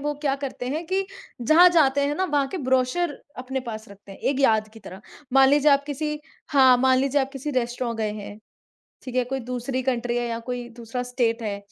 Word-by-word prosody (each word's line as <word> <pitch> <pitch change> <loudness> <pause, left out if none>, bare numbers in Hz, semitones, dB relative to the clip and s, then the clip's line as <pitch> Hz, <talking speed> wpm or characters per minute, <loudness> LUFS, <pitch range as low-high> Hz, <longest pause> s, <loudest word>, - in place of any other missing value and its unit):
वो 295 +1 -1
क्या 275 -2 +1
करते 255 -2 -5
हैं 310 +6 -3
कि 380 +3 0 0.4
जहाँ 315 +9 +7
जाते 285 -5 +3
हैं 290 - -1
ना, 375 - 0
वहाँ 290 -5 +1
के 375 - -5
ब्रोशर 260 +5 +1 0.3
अपने 265 +1 -4
पास 220 -4 -7
रखते 200 0 -14
हैं, - - -13
एक 275 0 -1
याद 220 -5 +3
की 225 - -13
तरह। 190 -1 -11 0.3
मान 270 0 +6
लीजिए 290 +1 +4
आप 280 0 +2
किसी 300 +1 -3 0.3
हाँ, 260 -4 +6
मान 260 0 +4
लीजिए 275 +1 +1
आप 265 - -2
किसी 275 +2 -5
रेस्ट्रों 240 -2 -2
गए 215 -1 -1
हैं, 205 0 -8 0.6
ठीक 255 - -8
है? 250 - +2
कोई 265 +2 -4
दूसरी 250 +2 -3
कंट्री 245 -2 -1
है 240 0 -1
या 230 - -3
कोई 245 -1 -4
दूसरा 235 +1 -5
स्टेट 240 -2 -1
है, 205 -2 -3
260 Hz, 220 wpm, -24 LUFS, 240-280 Hz, 0.6 s, जहाँ